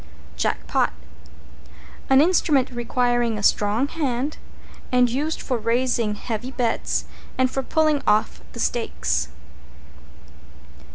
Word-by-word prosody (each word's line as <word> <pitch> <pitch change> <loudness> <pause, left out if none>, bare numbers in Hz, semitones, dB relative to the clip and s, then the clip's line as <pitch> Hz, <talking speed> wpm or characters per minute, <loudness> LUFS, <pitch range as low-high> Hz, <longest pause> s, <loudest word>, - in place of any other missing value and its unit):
=JACK - - -1
POT= - - +1 1.2
An 270 +1 +6
instrument 305 -6 +3
requiring 240 -1 0
a 205 - -5
strong 210 +7 +2
hand, 285 -2 -2 0.5
and 250 -1 +5
used 300 +6 -1
for 250 -3 -2
raising 230 -1 +1
heavy 230 +3 -4
bets, 245 -3 -1 0.3
or 260 - +4
for 265 +1 -1
pulling 310 +1 +2
off 215 +1 +2
the 235 - -8
stakes. 75 - -1
245 Hz, 110 wpm, -23 LUFS, 230-270 Hz, 1.2 s, An